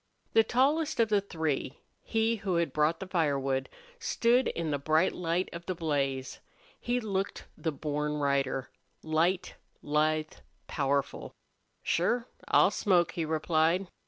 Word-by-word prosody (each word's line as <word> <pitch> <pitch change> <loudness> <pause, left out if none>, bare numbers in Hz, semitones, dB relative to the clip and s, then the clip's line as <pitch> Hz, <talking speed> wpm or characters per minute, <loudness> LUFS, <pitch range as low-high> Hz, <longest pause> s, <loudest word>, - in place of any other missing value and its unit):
The 225 - +6
tallest 285 +7 +1
of 225 -1 +4
the 205 -2 +3
three, 160 -8 -2 0.2
he 225 +1 0
who 195 -4 -2
had 170 -5 0
brought 155 +2 +2
the 190 - -5
firewood, 140 -7 0 0.3
stood 240 +2 +2
in 165 -2 -2
the 145 - 0
bright 155 +5 +2
light 175 +1 -1
of 170 0 -8
the 185 - -1
blaze. 140 -5 -2 0.4
He 245 +1 0
looked 195 -4 -3
the 160 - -2
born 150 0 -2
rider, 140 -2 0 0.3
light, 165 +4 +1 0.3
lithe, 155 +1 +1 0.3
powerful. 140 -1 -2 0.5
"Sure, 230 +8 +1 0.2
I'll - - +5
smoke," 175 -5 +2
he 165 -1 -2
replied. 160 +3 +1
165 Hz, 135 wpm, -30 LUFS, 150-195 Hz, 0.5 s, The